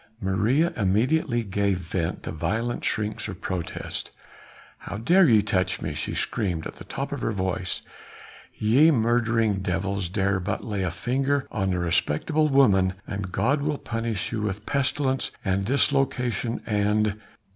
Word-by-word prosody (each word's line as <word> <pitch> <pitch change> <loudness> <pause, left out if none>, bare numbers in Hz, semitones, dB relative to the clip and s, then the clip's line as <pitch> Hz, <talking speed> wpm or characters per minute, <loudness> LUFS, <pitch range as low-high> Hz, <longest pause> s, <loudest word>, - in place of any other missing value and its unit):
Maria 115 - +1
immediately 120 - +1
gave 100 -1 0
vent 85 -1 -3
to - - -4
violent 110 +10 -2
shrieks 105 -1 -1
of 95 -4 -7
protest. 90 -4 -4 0.7
"How 100 - -6
dare 170 - +5
ye 110 -3 +5
touch 95 -1 0
me!" 80 - -3
she 75 - -3
screamed 90 -6 -1
at - - -7
the - - -9
top - - -4
of - - -4
her - - 0
voice, 95 -2 -2 0.7
"ye 130 +9 +5
murdering 115 -5 +2
devils 95 0 -2
dare 100 0 +1
but 100 +3 -3
lay 105 -3 -3
a 90 - 0
finger 135 +9 0
on 95 -3 0
a 90 - 0
respectable 90 - +1
woman 100 -10 +4
and 100 -2 -5
God 140 +9 +1
will 150 0 -1
punish 115 -5 -3
you 110 -2 -2
with 105 0 -3
pestilence 135 -1 +1 0.2
and 95 0 +1
dislocation 125 -3 +1
and 105 0 +1
105 Hz, 150 wpm, -25 LUFS, 95-125 Hz, 0.7 s, dare